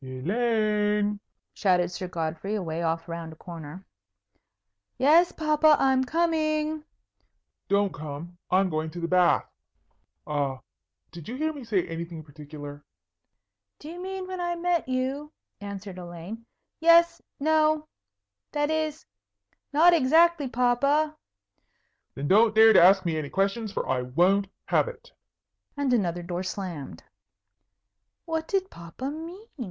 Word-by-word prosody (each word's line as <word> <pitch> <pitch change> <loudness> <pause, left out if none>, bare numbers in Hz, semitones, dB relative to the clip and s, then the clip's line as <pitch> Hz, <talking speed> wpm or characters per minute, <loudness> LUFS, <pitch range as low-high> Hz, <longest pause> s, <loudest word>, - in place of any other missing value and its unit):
"Elaine!" 210 - 0 0.3
shouted 180 -3 +2
Sir 180 +1 -5
Godfrey, 165 +3 -3
away 170 -5 -3
off 165 0 -1
round 165 -1 -6
a - - -15
corner. 165 +2 -10 1.1
"Yes, 320 +7 +5
papa, 305 -1 +3
I'm 265 -1 +2
coming." 310 0 0 0.8
"Don't 200 -1 +1
come. 155 +4 -8
I'm 185 0 +2
going 155 0 -2
to 175 - -8
the 170 - -2
bath. 180 0 +3 0.8
A 140 -3 -1 0.5
did 170 +1 -10
you 245 - -4
hear 315 +3 -1
me 285 -3 -9
say 210 -6 0
anything 165 -1 -6
particular?" 145 -1 -10 0.9
"Do 300 - -10
you 350 +2 -8
mean 380 0 -5
when 370 -1 -5
I 345 0 -1
met 345 -4 -1
you?" 265 +4 -2 0.3
answered 200 -2 -7
Elaine. 180 +6 -9 0.3
"Yes 335 +1 +5 0.2
no 310 +1 +2 0.7
that 295 0 0
is, 315 -1 -2 0.7
not 330 +4 +6
exactly, 325 +1 +4
papa." 275 +5 +1 1.0
"Then 140 +1 -4
don't 215 +4 +4
dare 220 0 +8
to - - +7
ask 190 +2 +6
me 160 -2 0
any 145 -2 -5
questions, 200 +3 -1
for - - -3
I 130 -1 0
won't 180 +10 +2 0.2
have - - +2
it." - - -10 0.7
And 280 -3 +1
another 175 -6 0
door 175 +1 -4
slammed. 175 - -6 1.2
"What 320 -1 -3
did 385 -1 -1
papa 170 +11 -7
mean?" 335 +7 -8
210 Hz, 130 wpm, -26 LUFS, -, 1.2 s, dare